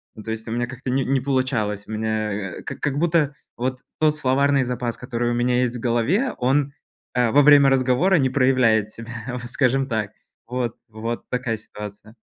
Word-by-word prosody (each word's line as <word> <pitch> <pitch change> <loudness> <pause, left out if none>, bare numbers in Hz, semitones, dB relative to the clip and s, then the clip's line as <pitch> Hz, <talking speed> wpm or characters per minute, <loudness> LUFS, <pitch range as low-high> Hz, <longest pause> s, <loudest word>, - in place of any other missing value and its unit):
Ну, 110 - -10
то 110 - -4
есть, 110 +1 -5
у - - -4
меня 120 +1 0
как-то 130 0 -7
не 135 0 +1
не 135 -1 +1
получалось. 125 -7 0
У - - -8
меня, 110 -1 -1 0.3
э, - - -12
как - - -6
как 140 -1 -1
будто, 160 -4 +2 0.2
вот, 130 +1 -2 0.2
тот 155 -1 +3
словарный 140 0 +2
запас, 125 -1 -3
который 120 -1 -2
у - - 0
меня 125 +1 +2
есть 125 -1 0
в - - -8
голове, 125 - +1
он, 135 +2 +1 0.4
э, 125 -2 +3
во 145 - +6
время 145 -1 +7
разговора 135 +8 +3
не 130 -3 +2
проявляет 125 -5 +3
себя, 115 +1 -9 0.2
вот, 125 -1 -5
скажем 135 0 +2
так. 110 -4 -2 0.4
Вот 125 -2 -3
вот 115 +2 -5
такая 125 -3 -1
ситуация. 105 +1 -10
125 Hz, 195 wpm, -23 LUFS, 115-135 Hz, 0.4 s, время